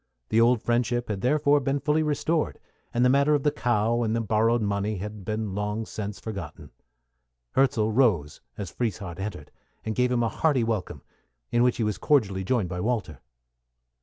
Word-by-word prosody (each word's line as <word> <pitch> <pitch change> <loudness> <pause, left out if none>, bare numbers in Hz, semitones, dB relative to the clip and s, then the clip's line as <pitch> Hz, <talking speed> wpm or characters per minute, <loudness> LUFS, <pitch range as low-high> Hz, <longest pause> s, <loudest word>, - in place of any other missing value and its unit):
The 115 - +3
old 120 -1 +3
friendship 120 0 0
had 100 -3 -3
therefore 145 +2 +3
been 140 +1 -1
fully 150 +3 +1
restored, 155 +1 0 0.3
and 120 +1 +2
the - - +5
affair 150 +2 +3
of 145 - -1
the 150 - +3
cow 120 -1 +1
and 110 -1 0
the - - +1
borrowed 115 +1 +2
money 100 +1 -1
had 105 +1 -6
been 110 -1 -3
long 105 +2 -2
since 105 -2 -6
forgotten. 85 -8 -7 0.8
Hirzel 115 -5 +2
rose 105 - +2 0.2
as 95 -4 -5
Frieshardt 95 -6 -4
entered, 100 +2 -6 0.3
and 110 - -1
gave 125 +2 +1
him 120 -1 +2
a - - +2
hearty 145 -4 +1
welcome, 110 -5 -3 0.5
in 120 - +3
which 125 0 +3
he 115 - 0
was 105 -3 -1
cordially 100 -10 +2
joined 110 -1 0
by 90 0 -5
Walter. 115 +2 -2
115 Hz, 180 wpm, -26 LUFS, 105-125 Hz, 0.8 s, the